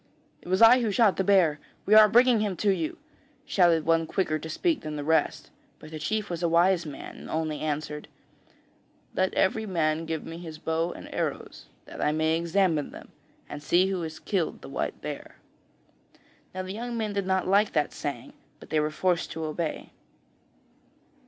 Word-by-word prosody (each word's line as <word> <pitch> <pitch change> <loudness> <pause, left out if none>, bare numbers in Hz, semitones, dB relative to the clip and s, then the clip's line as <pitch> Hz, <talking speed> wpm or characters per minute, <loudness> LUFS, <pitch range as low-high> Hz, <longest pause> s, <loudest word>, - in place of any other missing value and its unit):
'It - - -15
was 185 +4 +3
I 245 +3 +8
who 230 - 0
shot 205 -1 +3
the 190 - +1
bear; 180 -6 +3 0.3
we 205 - +2
are 215 0 +9
bringing 240 +1 +5
him 205 -3 -1
to 205 - +2
you,' 165 -5 -2 0.5
shouted 170 -4 +3
one 165 0 +2
quicker 155 -4 -1
to 160 - -8
speak 325 - 0
than 155 -1 -5
the 145 - -4
rest; 160 0 0 0.3
but 155 - -13
the 155 - -6
chief 210 +7 -2
was 170 -2 -5
a 170 - +1
wise 170 0 +3
man, 145 - -9
and - - -11
only 155 -1 -2
answered: 150 0 -4 1.1
'Let 185 0 +1
every 220 +3 +1
man 165 -3 0
give 160 -1 -3
me 165 +1 -8
his 160 -3 -8
bow 160 +2 -1
and - - -10
arrows, - - -4 0.2
that - - -9
I 150 - +2
may 160 +1 +1
examine 170 -2 +1
them, - - -12 0.4
and 145 - -7
see 180 +5 +2
who 185 -2 -2
has 160 -1 -6
killed 170 +1 -2
the - - -9
white - - -3
bear.' - - -7 1.2
Now 185 - -3
the 185 +1 -6
young 235 +2 -5
men 215 -2 -2
did 200 -2 -2
not 190 -1 +1
like 200 +2 +3
that 150 -2 0
saying, 245 - -6 0.3
but - - -15
they 155 - +2
were 150 0 0
forced 175 +2 0
to 160 0 -4
obey. 155 +1 -4
170 Hz, 190 wpm, -27 LUFS, 155-195 Hz, 1.2 s, are